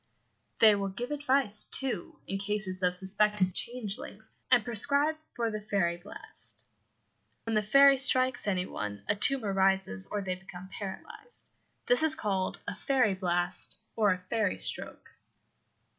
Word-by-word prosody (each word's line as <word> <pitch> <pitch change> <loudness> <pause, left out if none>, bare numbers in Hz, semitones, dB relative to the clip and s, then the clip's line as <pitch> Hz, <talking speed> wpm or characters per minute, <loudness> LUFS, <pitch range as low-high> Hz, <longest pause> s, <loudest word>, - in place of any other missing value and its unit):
They 220 -2 +7
will 200 -1 -2
give 240 +7 -6
advice, 270 -7 +2
too, 265 -10 -3
in 195 - -4
cases 200 -2 0
of 180 -1 +1
suspected 190 0 +1
changelings, 220 -2 -4 0.2
and 245 -4 +4
prescribe 280 +7 +2 0.2
for 230 -1 -1
the 215 0 -5
"fairy 195 -5 -1
blast" 180 +4 -3 0.8
(when 225 - -4
the 215 - +2
fairy 275 +5 +5
strikes 255 -3 +2
any 185 -2 0
one 105 - -6
a - - +1
tumour 220 -1 +3
rises, 190 - +1
or 205 - -3
they 185 -1 -2
become 185 0 -10
paralysed. 425 - -7 0.3
This - - +5
is 315 0 +4
called 195 -9 -2
a 205 - -4
"fairy 250 -3 +1
blast" 180 -1 -2 0.2
or 210 -3 +3
a 185 - 0
"fairy 215 -3 0
stroke"). - - -4
210 Hz, 145 wpm, -29 LUFS, 190-250 Hz, 0.8 s, They